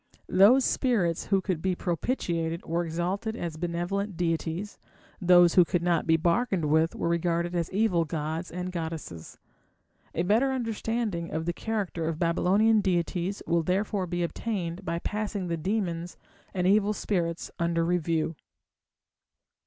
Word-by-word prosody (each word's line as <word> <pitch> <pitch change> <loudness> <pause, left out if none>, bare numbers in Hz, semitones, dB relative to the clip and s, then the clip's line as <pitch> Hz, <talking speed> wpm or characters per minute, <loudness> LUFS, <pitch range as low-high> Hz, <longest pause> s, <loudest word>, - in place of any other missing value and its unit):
Those 220 +8 +6
spirits 200 - +1
who 195 -1 +2
could 185 -5 -2
be 185 0 0
propitiated 170 -3 -2
were 170 +2 0
exalted 180 +7 -2
as 170 -8 -4
benevolent 175 +4 -2
deities; 170 +3 -2 0.4
those 175 -1 +6
who 180 - +7
could 175 0 -1
not 170 -2 +1
be 160 0 +5
bargained 175 +1 +1
with 160 +2 +2
were - - -2
regarded 170 0 0
as 170 -2 -1
evil 195 -4 +2
gods 160 +2 -3
and 180 +1 -4
goddesses. 160 - -6 0.8
A 170 - +1
better 225 +9 +3
understanding 225 -7 -2
of 160 +1 -3
the 175 - -1
character 195 -6 -3
of 165 -1 -2
Babylonian 195 +6 +3
deities 180 +1 -1
will 170 0 +2
therefore 190 +2 -1
be 175 0 -1
obtained 180 -1 -3
by 170 -2 -2
passing 205 0 -3
the 170 - 0
demons 175 -1 -2 0.3
and 180 -1 -1
evil 205 +2 +4
spirits 170 -5 -2
under 170 0 +1
review. 165 -2 0
175 Hz, 145 wpm, -28 LUFS, 165-200 Hz, 0.8 s, who